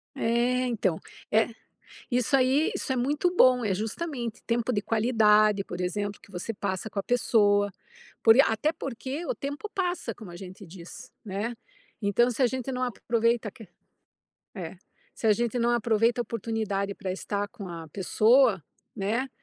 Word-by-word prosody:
É, 245 +2 +1
então. 195 -8 0 0.3
É 220 +1 +4 0.6
isso 250 +2 +2
aí, 265 +4 +3
isso 265 - -2
é - - -1
muito 295 +8 +1
bom, 255 -6 +5
é 200 - +1
justamente, 235 - -4
tempo 235 +1 0
de 205 - 0
qualidade, 215 -3 +3
por 175 0 -7
exemplo, 205 +3 -2
que - - -18
você 190 +5 -4
passa 200 0 -3
com - - -5
a - - 0
pessoa. 205 -4 +3 0.5
Por 225 0 +7
ia 275 - +7
até 295 +8 +1
porque, 275 +3 -5
o - - -1
tempo 285 +9 -5
passa, 360 -2 -2
como 215 -6 -11
a 175 - -9
gente 185 +2 -10
diz, 180 +8 -11
né. 210 +4 -3 0.5
Então 210 +5 +3
se 245 +2 -1
a - - +6
gente 260 +1 -3
não 255 - -2
ap 245 -4 -2
aproveita 230 -1 +1
que 215 -1 -14 0.9
É. 180 -2 -6 0.4
Se 225 - -3
a - - +7
gente 240 +3 -1
não 235 +1 +2
aproveita 235 0 +2
a - - +2
oportunidade 215 -3 -2
pra 190 -2 -4
estar 200 +2 -3
com 200 -2 -9
a 165 -2 -7
pessoa, 215 - +3 0.3
né, 225 +7 -1
225 Hz, 175 wpm, -27 LUFS, 200-250 Hz, 0.9 s, Por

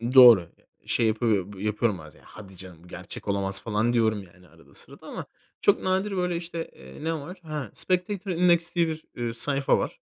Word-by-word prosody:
Doğru. 120 -6 +11 0.2
Eee, - - -31 0.2
şey 115 -2 +2
yapıyo 110 -3 +1
b 95 - -8
yapıyorum 105 -1 0
bazen: 75 -3 -14
"Hadi 95 -3 -12
canım, 90 -2 -12
gerçek 95 +4 -8
olamaz." 100 -1 +1
falan 115 +2 0
diyorum 110 -3 +2
yani 90 -1 -20
arada - - -21
sırada - - -13
ama - - -6 0.4
çok 205 - +4
nadir, 190 +2 0
böyle, 180 -1 0
işte, 170 -1 -5
eee, 65 - -12
ne 165 - 0
var? 165 +5 -7
Ha 150 -7 -5
Spectactor 185 +1 -1
Index 170 0 +2
diye 170 -1 +3
bir, 160 0 -5
eee, 120 -1 -3
sayfa 135 +3 +1
var. - - -3
120 Hz, 190 wpm, -26 LUFS, -, 0.4 s, Doğru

